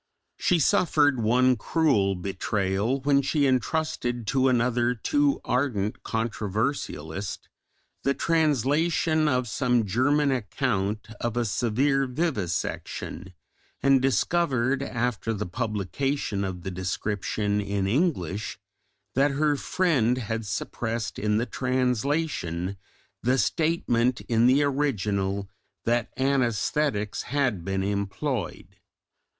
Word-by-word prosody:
She 180 - +3
suffered 145 - +3
one 125 +3 +4
cruel 105 -6 +2
betrayal 100 +5 -1
when 140 0 +3
she 140 +1 +1
entrusted 130 -2 0
to 130 +4 +2
another 125 0 +2
too 290 - +1
ardent 120 -6 0
controversialist 105 - -3 0.5
the 140 0 +1
translation 155 +1 +2
of 125 -3 +1
some 120 -1 +1
German 140 +8 +2
account 110 -4 -1
of 120 0 -2
a 120 - +1
severe 130 +6 +1
vivisection, 100 - -3 0.5
and 135 -1 +5
discovered, 135 - +1
after 120 -4 -2
the 105 +1 -3
publication 105 +4 -2
of 90 -2 -4
the 95 - -4
description 100 +3 -1
in 100 -1 -1
English, 105 - -1 0.6
that 140 +4 +3
her 145 +1 +1
friend 135 -7 +1
had 115 -2 -3
suppressed 115 +3 -3
in 105 0 +1
the 115 - +1
translation 125 - -1 0.5
the 130 +3 +2
statement 125 - +1
in 115 0 +2
the 135 +3 +4
original 100 -9 0 0.4
that 120 0 +1
anaesthetics 130 -3 0
had 130 -10 -1
been 95 +1 -1
employed. 100 - -3
120 Hz, 105 wpm, -26 LUFS, 105-140 Hz, 0.6 s, and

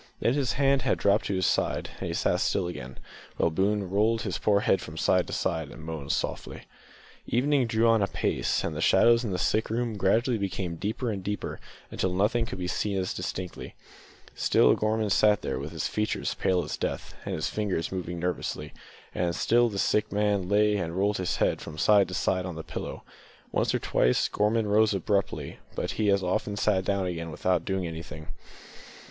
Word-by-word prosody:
Then 120 - +2
his 135 -6 0
hand 140 +1 +3 0.2
dropped 100 +2 +2
to 100 - -1
his 95 -1 +1
side, - - 0
and - - -4
he - - -3
sat - - +1
still 95 - +1
again, 65 -7 -7 0.4
while 85 - +2
Boone 100 +3 +1
rolled 110 +4 +1
his 95 -5 -3
poor 100 -1 +3
head 95 - +2
from 80 +1 -9
side 90 +2 +2
to - - -6
side 80 -3 -1
and 80 - -11
moaned 80 -3 -4
softly. - - -3 0.6
Evening 135 +1 +2
drew 115 0 +2
on 115 -1 +4
apace, 100 - 0
and - - -3
the - - -3
shadows 115 +1 +5
in 115 - -2
the 90 - -1
sick 110 +4 +1
room 115 -1 -1
gradually 110 +5 +2
became 95 -3 -3
deeper 110 +7 -2
and 95 -3 -5
deeper 105 0 -4 0.3
until 95 - -1
nothing 105 +5 +1
could - - -6
be 90 -1 -3
seen 100 +2 -1
distinctly. 90 -1 -4 0.6
Still - - +4
Gorman 110 -1 0
sat 105 +1 +4
there, - - -2
with 70 +3 -6
his 80 -2 -2
features 105 0 -1
pale 90 -2 +1
as - - -5
death, - - -4
and - - -3
his 80 - -1
fingers 100 -6 -2
moving 90 -2 -4
nervously; 90 +1 -3 0.4
and 85 -1 -1
still 120 +5 +3
the 100 - -6
sick 105 +2 +1
man 100 -3 +1
lay 105 0 +3
and 85 -2 -3
rolled 100 +2 +1
his 90 -1 -1
head - - +1
from 80 - -8
side 100 +2 +5
to 90 - -5
side 95 0 0
on 90 - -6
the 80 - -6
pillow. - - -6 0.5
Once - - +1
or - - +1
twice 60 - +2
Gorman 105 +1 +1
rose 105 0 +3
abruptly, 100 +1 -1 0.2
but - - -2
he 105 -2 0
as 100 -1 +3
often 100 +2 -1
sat 95 -2 +1
down 100 -1 0
again 85 -2 -4
without 90 +1 0
doing 95 -1 -1
anything. 80 -2 -7
100 Hz, 195 wpm, -27 LUFS, 90-110 Hz, 0.6 s, shadows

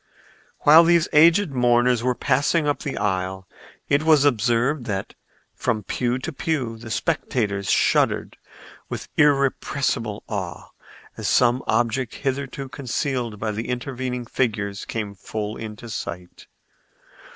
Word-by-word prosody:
While 155 +3 +8
these 170 -1 +4
aged 165 +3 +5
mourners 120 -1 +3
were 125 +1 0
passing 150 +4 +1
up 145 - 0
the 140 - -4
aisle 95 -1 -2 0.4
it 145 +1 +3
was 155 -2 +4
observed 120 +2 +1
that 95 -2 -3 0.4
from 110 -2 -1
pew 120 +4 -1
to 150 +5 -5
pew 135 -6 -2
the 115 0 -9
spectators 110 - -1
shuddered - - +2 0.5
with - - -6
irrepressible 140 -5 +1
awe 95 -6 -5 0.5
as - - -3
some 125 +1 +3
object 115 +2 0
hitherto 135 0 -3
concealed 125 -3 -3
by 110 0 -2
the 110 +3 -5
intervening 125 -1 -3
figures 105 -5 -2
came 105 -3 -4
full 105 +2 -5
in 110 -1 -7
sight. 90 -5 -7
120 Hz, 125 wpm, -23 LUFS, 110-140 Hz, 0.5 s, While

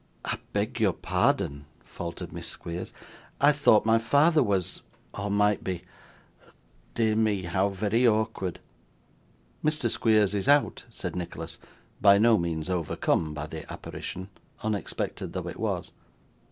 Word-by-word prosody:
'I - - -2
beg - - -1
your - - +3
pardon,' 70 0 0 0.2
faltered 85 -1 -6
Miss - - -6
Squeers; 85 +2 -6 0.5
'I 145 +1 +6
thought 140 -8 +4
my 115 0 +4
father 150 +7 +4
was 100 -7 0 0.3
or 100 +1 -3
might 105 0 +2
be 90 -2 -3 1.1
dear 110 -2 +2
me, 105 -3 +1
how 95 +3 +1
very 105 +5 +2
awkward!' 110 -5 0 1.0
'Mr. 150 -7 +1
Squeers 105 -3 +3
is 100 -2 -1
out,' 145 0 +3
said 90 -7 -5
Nicholas, 85 -2 -6 0.4
by 100 0 +7
no 110 +1 +5
means 80 -2 -2
overcome 85 -3 0
by 75 0 -4
the 80 0 -8
apparition, 95 +1 -6 0.3
unexpected 105 -5 -3
though - - -4
it - - -7
was. - - -2
100 Hz, 135 wpm, -27 LUFS, 90-110 Hz, 1.1 s, by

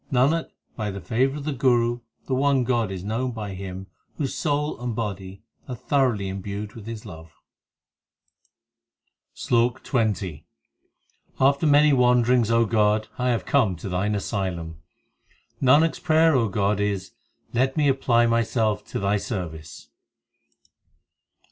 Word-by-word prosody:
Nanak, 140 +6 +2 0.3
by 105 -3 -3
the 100 0 -5
favour 130 +8 0
of 145 - -7
the 150 0 -2
Guru 120 -2 +2 0.3
the 135 - -3
one 135 0 +2
God 120 -4 0
is 95 -2 -6
known 120 +5 -2
by 105 -3 -5
him 95 0 -7 0.3
Whose 140 -4 -2
soul 150 -3 -2
and 120 -2 -3
body 100 -3 -5 0.2
are 125 - -5
thoroughly 125 -5 0
imbued 100 +2 -5
with 110 -2 -11
His 115 -2 -7
love, 80 0 -11 2.0
SLOK 120 +1 0
XX 105 - -1 1.0
After 140 +3 +3
many 145 0 +5
wanderings, 125 -2 +3
O 115 0 +3
God, 105 -1 +1
I 125 0 +1
have 120 -2 0
come 115 -10 +2
to 85 +4 -7
Thine 95 +4 -1
asylum; 90 -6 -4 0.8
Nanak 145 +5 +5
s - - -11
prayer, 155 -7 +3
God, 100 +1 0
is 100 -2 -2 0.4
Let 130 +4 +1
me 150 -2 +3
apply 125 -3 +3
myself 115 -2 +1
to - - -4
Thy 100 +1 +1
service. 80 - -6
115 Hz, 135 wpm, -24 LUFS, 100-130 Hz, 2.0 s, many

